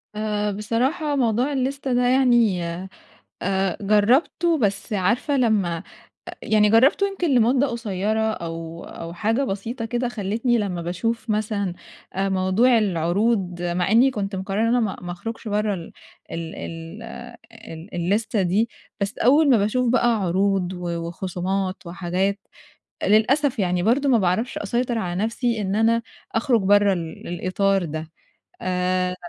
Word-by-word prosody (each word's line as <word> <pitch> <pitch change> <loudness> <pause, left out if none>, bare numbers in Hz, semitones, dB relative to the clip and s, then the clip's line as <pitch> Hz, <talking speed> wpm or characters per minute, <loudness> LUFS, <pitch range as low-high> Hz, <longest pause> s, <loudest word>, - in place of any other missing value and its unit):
آآ، 210 -1 -1
بصراحة 255 - -1
موضوع 245 +1 +1
الليستة 270 0 -1
ده 245 - +2
يعني 240 -8 +3 0.8
آآ 190 -1 0
جرّبته 260 - +3
بس 210 -2 -1
عارفة 235 - +1
لمّا 205 -8 +2 0.5
أ - - -4
يعني 210 -1 +3
جرّبته 270 - +5
يمكن 350 -8 -1
لمُدّة 250 +4 +4
قصيرة 220 -3 -2
أو 165 -2 -6
أو 165 0 -8
حاجة 225 +9 0
بسيطة 225 +3 -4
كده، 240 +2 -1
خلتّني 230 +2 0
لمّا 180 -5 -2
باشوف 225 +7 -2
مثلًا 210 -3 -1 0.4
آآ 195 +1 -1
موضوع 190 +6 +3
العروض 180 0 0
مع 175 +1 0
إنّي 245 +5 +5
كنت 200 -4 -3
مقرّرة 195 +2 -2
إن - - +3
أنا 245 +1 +3
ما 210 -4 -1
ما 175 0 -5
أخرُجش 225 +5 -6
برّه 210 0 0
ال 170 -2 -8 0.4
ال 165 -1 -5
ال 165 +6 -7 0.7
ال 165 +5 -10
الليستة 200 +4 0
دي، 205 +6 +1 0.3
بس 200 +1 -2
أول 285 +4 +5
ما 245 - +6
باشوف 240 +5 +1
بقى 240 -1 +3
عروض 190 0 +1
و 180 -1 -5 0.2
وخصومات 185 +1 -3
وحاجات، 185 +3 -1 0.7
للأسف 245 +5 +3
يعني 180 -2 +1
برضه 270 +6 +2
ما 240 - +5
باعرفش 200 +5 0
أسيطر 235 +3 -1
على 185 -1 -2
نَفْسي 230 -1 -1
إن 195 0 -1
أنا 225 +1 +3 0.3
أخرُج 230 -2 +2
برّه 205 0 +4
ال 165 -3 -6
الإطار 185 +2 0
ده. 155 +1 -6 0.5
آآ، 180 0 0
210 Hz, 145 wpm, -23 LUFS, 185-235 Hz, 0.8 s, ما